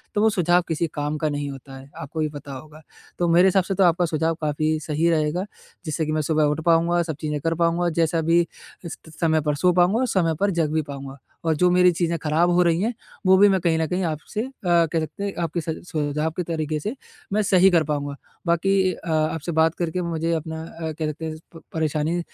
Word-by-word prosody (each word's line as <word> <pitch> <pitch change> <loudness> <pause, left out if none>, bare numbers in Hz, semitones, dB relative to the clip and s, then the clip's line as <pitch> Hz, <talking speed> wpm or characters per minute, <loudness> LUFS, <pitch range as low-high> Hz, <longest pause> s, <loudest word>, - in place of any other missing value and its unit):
तो 205 - +2
वो 220 - +5
सुझाव 180 -3 +3
किसी 165 0 -1
काम 150 +1 -2
का 155 0 0
नहीं 145 -1 -3
होता 135 0 -10
है, 135 +1 -13
आपको 160 +3 -6
भी 155 -1 0
पता 145 -1 -9
होगा। 150 +4 -11 0.4
तो 175 - +2
मेरे 175 +3 +6
हिसाब 190 - +4
से 195 - -3
तो 190 - +3
आपका 175 0 +3
सुझाव 160 0 0
काफ़ी 155 +1 0
सही 155 +2 0
रहेगा, 160 +3 0 0.4
जिससे 155 +1 -1
कि 155 - -2
मैं 155 0 +1
सुबह 155 +1 +1
उठ 150 +2 +1
पाऊँगा, 170 +1 +3
सब 160 -2 -4
चीज़ें 150 -1 -2
कर 165 +2 0
पाऊँगा 170 +1 +1
जैसा 165 0 +1
अभी 165 +1 +3 0.4
इस 165 - -5
किस 160 -1 -15
समय 160 -2 +2
पर 150 0 0
सो 180 +5 +3
पाऊँगा 180 +6 +3
और 260 - +1
समय 170 -7 +1
पर 200 0 +2
जग 165 -4 0
भी 160 - +2
पाऊँगा। 140 -2 -8 0.3
और 160 - +2
जो 180 +4 +3
मेरी 180 0 +5
चीज़ें 170 0 -1
खराब़ 160 +3 +2
हो 175 +1 +4
रही 170 0 +2
हैं, 230 +4 0 0.3
वो 190 0 +6
भी 205 +1 +7
मैं 190 -1 +2
कहीं 165 -2 +2
न 160 - +1
कहीं 180 +3 -1
आपसे 160 +6 -3
अ, 255 - -4 0.2
कह 170 -2 +3
सकते 155 +6 -5
हैं, 200 - -2
आपके 165 +1 -2
सझ 160 0 -3
सुझाव 150 0 -1
के 180 - 0
तरीके 155 -2 -2
से 210 - -4 0.4
मैं 215 - +3
सही 190 -1 +5
कर 165 -2 +4
पाऊँगा। 145 -1 -3 0.3
बाकी 185 +2 +2
अ, 170 - -9
आपसे 155 +1 0
बात 160 0 +2
करके 175 +1 -1
मुझे 165 -1 -2
अपना 160 0 -4
अ, 160 -1 -6
कह 155 +1 -4
सकते 155 +2 -5
हैं 155 -1 -4 0.2
प 165 - -11
परेशानी 160 +1 0
165 Hz, 240 wpm, -23 LUFS, 155-175 Hz, 0.4 s, भी